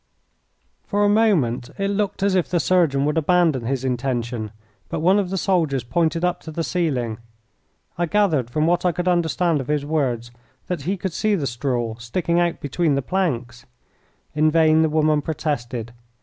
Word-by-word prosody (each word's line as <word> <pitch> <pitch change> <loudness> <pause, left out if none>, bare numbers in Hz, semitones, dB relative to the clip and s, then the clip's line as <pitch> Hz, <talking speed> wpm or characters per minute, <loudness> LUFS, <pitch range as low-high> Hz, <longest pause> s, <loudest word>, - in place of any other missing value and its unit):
For 205 0 +1
a - - +4
moment 175 - +2
it 195 0 -1
looked 200 -1 -1
as 200 -1 +2
if 185 -2 +1
the 175 - +1
surgeon 160 -5 +2
would 150 +2 +1
abandon 160 -6 +2
his 135 0 -2
intention, 120 -3 -2 0.4
but - - -3
one 185 +6 +4
of 190 -3 -1
the 190 - -2
soldiers 160 - +1
pointed 165 +7 0
up 180 - -1
to 160 - -8
the 165 +2 -3
ceiling. 130 -12 -1 0.8
I 175 - +1
gathered 160 - +1
from 155 +5 0
what 175 +1 +2
I 180 -1 +2
could 180 +2 -3
understand 170 -2 +1
of 130 - -8
his 150 -1 0
words 125 -6 -1 0.3
that 180 -5 -3
he 195 - 0
could 185 -1 -4
see 215 +3 +1
the 155 -7 -2
straw 120 -2 -2
sticking 170 +9 -1
out 175 -1 0
between 145 +1 0
the 140 - -1
planks. 125 -9 -2 0.7
In 155 +1 +3
vain 160 0 +4
the 160 - +3
woman 155 -1 +2
protested. 125 -7 -3
155 Hz, 180 wpm, -22 LUFS, 130-180 Hz, 0.8 s, a